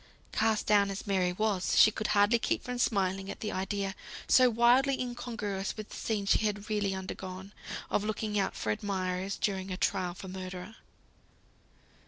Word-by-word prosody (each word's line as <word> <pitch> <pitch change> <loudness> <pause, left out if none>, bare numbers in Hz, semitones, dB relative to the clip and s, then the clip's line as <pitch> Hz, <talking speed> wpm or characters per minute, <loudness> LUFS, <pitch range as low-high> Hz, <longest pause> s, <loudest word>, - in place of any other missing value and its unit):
Cast 220 -1 +1
down 205 -1 +4
as 195 0 -5
Mary 185 -3 +1
was, 195 -1 0
she 215 - +8
could 215 0 -3
hardly 210 +3 +4
keep - - -1
from 250 0 -4
smiling 195 -4 +1
at - - -7
the 210 - -2
idea, 195 +1 -2 0.3
so 255 -1 +6
wildly 245 +4 +4
incongruous 225 -6 -3
with 215 -1 -7
the - - -9
scene 210 -3 -2
she - - +4
had 210 0 -2
really 200 -2 0
undergone, 190 +1 -7 0.4
of 205 - +1
looking 210 0 -1
out 195 - -1
for 105 - -1
admirers 185 - -2
during 195 -2 -1
a 185 - -3
trial 185 -3 0
for 190 - -9
murder. 185 +2 -7
200 Hz, 170 wpm, -30 LUFS, 190-215 Hz, 0.4 s, she